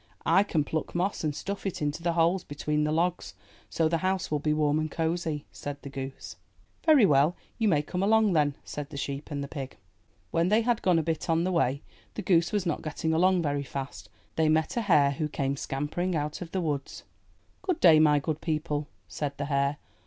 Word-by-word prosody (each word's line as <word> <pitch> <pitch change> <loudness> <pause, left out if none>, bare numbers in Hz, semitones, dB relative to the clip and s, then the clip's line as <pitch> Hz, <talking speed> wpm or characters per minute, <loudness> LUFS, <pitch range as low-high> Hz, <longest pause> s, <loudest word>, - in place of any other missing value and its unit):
I 195 - +5
can 165 -7 0
pluck 160 +3 -4
moss 185 +2 -1
and 150 -2 -1
stuff 200 +5 -5
it 195 - -3
into 150 +2 -2
the 170 0 0
holes 170 +2 +2
between 150 +1 -1
the 150 - 0
logs 175 +3 -1 0.3
so 160 - +1
the 165 +1 0
house 185 -2 -1
will 150 - +1
be 150 +1 0
warm 150 0 +2
and 155 0 -2
cosy," 160 -2 -2
said 145 0 -6
the 140 - -7
goose. 135 0 -7 0.5
''Very 295 -8 +7
well, 145 +4 +4 0.2
you 225 - +2
may 150 -7 +3
come 180 +4 -3
along 215 0 +4
then." 145 -3 +2
said 145 -1 -6
the - - -8
sheep 140 +1 -4
and 140 -2 -3
the - - -5
pig. 135 -3 -7 0.5
When 170 +2 +2
they 215 +3 +4
had 235 -1 +1
gone 180 -3 +3
a 165 - +1
bit 165 +1 -2
on 165 0 +2
the 185 - 0
way 140 -5 +1
— - - -30
the 210 - -4
goose 170 -2 +3
was 205 -3 0
not 170 - -1
getting 160 +1 -2
along 180 +2 +3
very 145 -2 0
fast 135 0 -6
— - - -37
they 160 -1 +3
met 155 0 +1
a 235 - +1
hare, 150 -9 +4
who 150 +2 -2
came 140 -1 -1
scampering 150 +7 -2
out 150 +1 -3
of 175 - -6
the 190 - -1
woods. 145 -4 -3 0.6
''Good 370 -3 -1
day, 160 -4 +7
my 150 -1 +5
good 150 +2 -2
people," 150 -2 -2 0.2
said 140 +10 -4
the 145 - -2
hare. 140 +1 +1
155 Hz, 225 wpm, -28 LUFS, 145-175 Hz, 0.6 s, Very